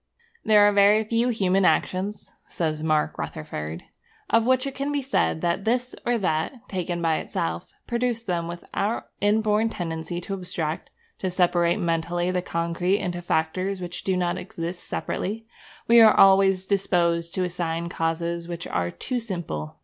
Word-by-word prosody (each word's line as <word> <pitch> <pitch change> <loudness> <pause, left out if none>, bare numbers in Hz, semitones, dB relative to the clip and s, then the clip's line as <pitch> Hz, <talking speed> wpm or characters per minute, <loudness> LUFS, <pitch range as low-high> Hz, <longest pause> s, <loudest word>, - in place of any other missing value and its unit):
'There 210 -1 +6
are - - +4
very 205 +2 +5
few 230 +3 +1
human 195 -4 +2
actions,' 190 +3 0 0.2
says 155 -2 -2
Mark 155 -1 0
Rutherford, 80 - -5 0.5
'of 230 +1 +4
which 260 +1 +3
it 275 - -3
can 275 +2 -2
be 290 - 0
said 260 - 0
that 175 +2 0
this 245 +3 0
or 240 0 +3
that, 185 - -2
taken 175 -2 -3
by 160 -1 +2
itself, 80 +1 -3
produced 235 -1 -1
them. 170 -3 -1
With 170 0 -7
our 215 +4 -1 0.2
inborn 215 +1 +2
tendency 165 -2 -4
to 195 - -5
abstract, 175 -4 -4 0.3
to 185 - -1
separate 175 -1 +2
mentally 170 +1 0
the 180 -1 0
concrete 170 +2 0
into 175 -3 -3
factors 185 +4 -1
which 180 -1 -6
do 190 -1 0
not 175 -1 0
exist 175 -1 -6
separately, 220 +4 -3 0.4
we 235 0 +7
are 220 -1 +7
always 195 -1 +6
disposed 170 -4 +1
to 185 - +1
assign 170 -1 -2
causes 170 0 -2
which 170 0 -5
are 85 0 -1
too 250 - -3
simple. 170 - -5
180 Hz, 160 wpm, -25 LUFS, 170-210 Hz, 0.5 s, we